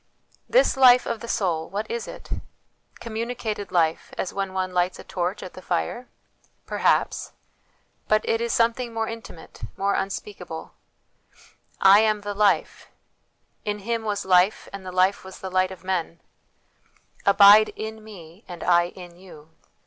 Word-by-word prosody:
This - - +4
life 250 -2 +6
of 230 -1 -3
the 235 - -8
soul, 170 -8 -1
what 205 +2 -3
is 235 0 -4
it? - - -11 0.7
Communicated 225 -3 -4
life, 165 -3 +1
as 185 - -3
when 195 -1 -3
one 185 -1 -3
lights 180 0 0
a - - -10
torch 180 +2 -3
at 185 - -9
the 185 - -11
fire? 185 - -3 0.6
Perhaps; - - 0 0.7
but 215 0 +2
it 225 0 +1
is 235 0 -1
some 230 0 +3
thing 240 -1 -6
more 225 0 -1
intimate, 225 -7 -10 0.2
more 200 +1 +1
unspeakable: 190 -4 -5 0.6
" - - -28
I - - +7
am 215 -1 +2
the 205 0 -4
Life"; 200 -5 +1 0.4
" - - -47 0.3
In 210 0 -2
Him 230 -1 -1
was 210 -2 -2
life, 185 +2 +3
and 200 -1 -7
the 185 - -7
life 185 +2 +2
was 190 0 -11
the 190 - -6
light 185 0 +2
of 190 -1 -11
men 175 -3 -2 0.3
"; - - -41
" - - -32
Abide 200 +2 +8
in 220 0 -7
Me 185 -2 -13
and 175 -2 -8
I 175 0 +4
in 175 -1 -12
you." 160 -4 -15
195 Hz, 170 wpm, -24 LUFS, 180-220 Hz, 0.7 s, Abide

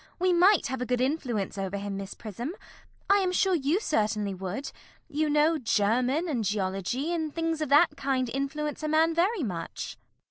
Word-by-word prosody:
We 365 0 +2
might 370 +4 +5
have 260 -1 -3
a - - 0
good 250 -1 +1
influence 250 - -1
over 195 +1 -2
him, 200 0 -4
Miss 195 0 -6
Prism. 235 - -6 0.5
I 400 - +5
am 375 -2 +1
sure 375 +1 +2
you 315 +3 +1
certainly 210 - 0
would. 190 - -5 0.4
You 305 0 0
know 300 +2 +3
German, 250 - +1
and 255 -8 -1
geology, 200 - -1
and 320 -3 -2
things 325 0 -2
of 305 - -1
that 295 +5 +5
kind 260 -2 0
influence 275 +4 -3
a 310 - -2
man 320 +2 +3
very 360 +2 +1
much. 170 -7 -5
275 Hz, 180 wpm, -28 LUFS, 215-325 Hz, 0.5 s, might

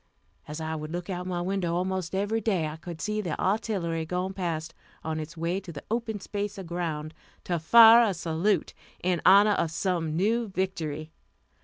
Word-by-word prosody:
As 150 +2 -6
I 160 0 -3
would 155 0 -5
look 175 +2 -4
out 180 0 -4
my 175 -1 -2
window 180 -2 -1
almost 185 0 -2
every 205 +3 0
day, 195 -7 +1
I 150 - -6
could 160 0 -9
see 215 +4 -1
the 175 -6 -4
artillery 190 -5 0
going 180 +3 -3
past 165 -4 -3 0.3
on 160 0 -2
its 155 +2 -7
way 170 +3 -1
to 190 -3 -10
the 145 -3 -9
open 225 -2 -2
space 205 +1 -4
of 190 - -6
ground, 165 -3 -4 0.3
to 175 -2 -1
fire 230 +7 +8
a 195 - -2
salute 170 +4 0 0.3
in 180 -2 +1
honor 200 +3 +7
of 170 -5 +1
some 165 -2 -1
new 225 +6 +1
victory. 160 -5 -3
180 Hz, 185 wpm, -27 LUFS, 160-195 Hz, 0.3 s, fire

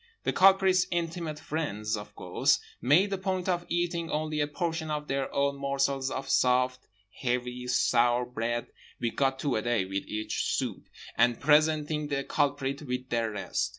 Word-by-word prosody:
The - - 0
culprit's 190 -1 +5
intimate 165 -2 -2
friends, 110 -10 -3
of 105 0 -9
course, - - +1 0.2
made 180 +10 +4
a 195 - -2
point 185 -1 -2
of 175 -2 -1
eating 170 -1 -1
only 155 0 -1
a 145 - +1
portion 160 +1 -3
of 150 -1 -3
their 135 0 -2
own 140 0 0
morsels 140 -1 0
of 130 +1 -4
soft, 125 0 +2 0.3
heavy, 125 0 -2
sour 120 0 +3
bread 120 -1 -3 0.3
(we 115 - -1
got 135 +1 +1
two 135 -1 -1
a - - 0
day, 120 -4 0
with 95 +1 -4
each 110 0 -2
soupe) - - -4 0.3
and 120 -1 +4
presenting 150 0 +3
the 140 -1 -1
culprit 140 0 -1
with 125 -2 -4
the 115 -1 +1
rest. 100 -4 -2
140 Hz, 165 wpm, -29 LUFS, 125-155 Hz, 0.3 s, culprit's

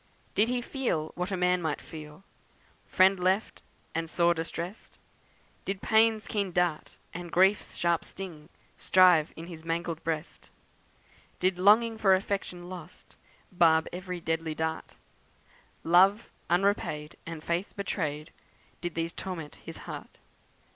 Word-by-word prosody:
Did 220 +3 +3
he 245 -1 -1
feel 205 - -2
what 180 +2 -3
a 190 - -2
man 180 0 +2
might 160 -3 -1
feel, 155 +2 -11 0.6
Friend 190 0 +4
left, 185 +4 0 0.3
and 165 0 -2
sore 170 +1 +3
distrest? 170 +4 -6 0.7
Did 195 0 -3
Pain's 220 -1 +4
keen 200 -3 -1
dart, 175 -3 -1 0.2
and 175 0 -7
Grief's 190 +3 +3
sharp 170 -1 +1
sting 170 -5 -8 0.3
Strive 180 -4 +5
in 165 - -8
his 165 -2 -10
mangled 165 0 -3
breast? 160 0 -4 0.9
Did 185 0 +1
longing 220 +4 +5
for 195 -3 +5
affection 185 -2 -3
lost 180 -2 -11 0.4
Barb 165 -3 +4
every 180 0 -5
deadly 165 -1 -2
dart; 160 0 -3 0.9
Love 190 +6 +4 0.2
unrepaid, 175 -5 0
and 165 -2 -6
Faith 170 +3 -1
betrayed, 155 -7 -3 0.5
Did 175 -1 -4
these 165 +1 -2
torment 170 -6 -6
his - - -7
heart? - - -8
175 Hz, 130 wpm, -29 LUFS, 165-190 Hz, 0.9 s, Strive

